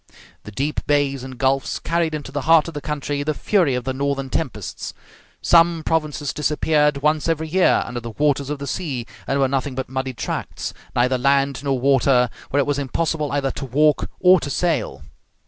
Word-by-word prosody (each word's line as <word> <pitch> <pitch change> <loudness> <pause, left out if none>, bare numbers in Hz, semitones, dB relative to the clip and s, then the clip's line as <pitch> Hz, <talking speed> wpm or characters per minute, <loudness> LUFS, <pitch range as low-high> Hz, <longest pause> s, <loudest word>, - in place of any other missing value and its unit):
The 105 - -8
deep 140 +8 -2
bays 140 -3 +1
and 130 -1 -8
gulfs 135 +1 0
carried 165 -1 -1
into 150 - -6
the 145 - -2
heart 165 -1 +6
of 165 - -7
the 145 - -5
country 145 -1 -3
the 150 +1 -1
fury 175 -9 +2
of 125 - -2
the 130 +1 -2
northern 135 -1 -2
tempests. 110 - -4 0.5
Some 170 -1 +4
provinces 155 -3 -1
disappeared 150 -1 +1
once 150 +1 +2
every 160 -1 -1
year 185 +3 +3
under 120 +1 -5
the 120 0 -7
waters 140 +3 0
of 150 - -2
the 140 - -6
sea, 140 -5 -3 0.2
and 140 - 0
were 135 - +3
nothing 135 0 -2
but 130 -1 -4
muddy 130 -1 -3
tracts, - - -4 0.2
neither 125 +1 +2
land 140 +1 +1
nor 135 -2 0
water, 130 -2 +3 0.2
where 140 - +1
it 140 - +3
was 145 -1 0
impossible 150 +2 -1
either 140 -1 0
to 140 - -6
walk 150 +4 +2
or 185 0 +6
to - - -5
sail. 155 -6 -1
140 Hz, 195 wpm, -21 LUFS, 130-155 Hz, 0.5 s, heart